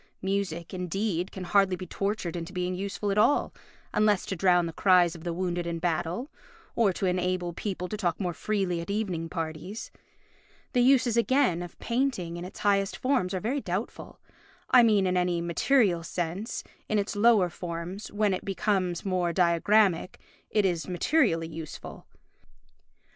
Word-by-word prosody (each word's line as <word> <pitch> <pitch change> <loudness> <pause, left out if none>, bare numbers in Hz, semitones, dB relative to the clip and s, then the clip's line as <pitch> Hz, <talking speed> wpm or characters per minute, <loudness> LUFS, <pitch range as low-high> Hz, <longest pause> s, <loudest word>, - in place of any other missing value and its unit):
Music, 190 -4 -2
indeed, 180 0 -2
can 190 - -7
hardly 195 0 +3
be 185 - -7
tortured 195 -2 -3
into 170 0 -5
being 180 -1 -2
useful 200 +2 -3
at 200 - +1
all, 255 +7 +3 0.4
unless 210 -2 +3
to 195 - -3
drown 180 -1 +3
the 165 - -5
cries 180 -3 +4
of 165 -2 -11
the 175 - -2
wounded 175 0 -2
in 170 0 -2
battle, 175 - -2 0.4
or 225 -4 +3
to 190 - -3
enable 180 -1 0
people 180 0 -4
to 215 - -4
talk 175 -5 -1
more 180 -3 -1
freely 190 -2 -1
at 170 - -8
evening 190 -6 -2
parties. 165 +6 -5 0.8
The 245 - +3
uses, 250 -2 +4
again, 235 -7 +2
of 175 -1 -8
painting 235 -9 -1
in 175 - -6
its 185 - -10
highest 200 -1 +1
forms 255 -9 +1
are - - -1
very 255 +8 -1
doubtful—I 210 +5 -1
mean 210 -4 +4
in 180 0 +1
any 180 -1 +1
material 175 +2 +2
sense; 175 +6 -4 0.3
in 215 - +2
its 205 +1 -1
lower 205 -4 +4
forms, 175 +4 -6
when 205 -1 +1
it 185 - -3
becomes 190 -3 -1
more 180 -3 0
diagrammatic, 180 +2 +2 0.3
it 210 -2 +2
is 175 -3 0
materially 180 - +1
useful. 160 -2 -9
185 Hz, 160 wpm, -28 LUFS, 175-210 Hz, 0.8 s, cries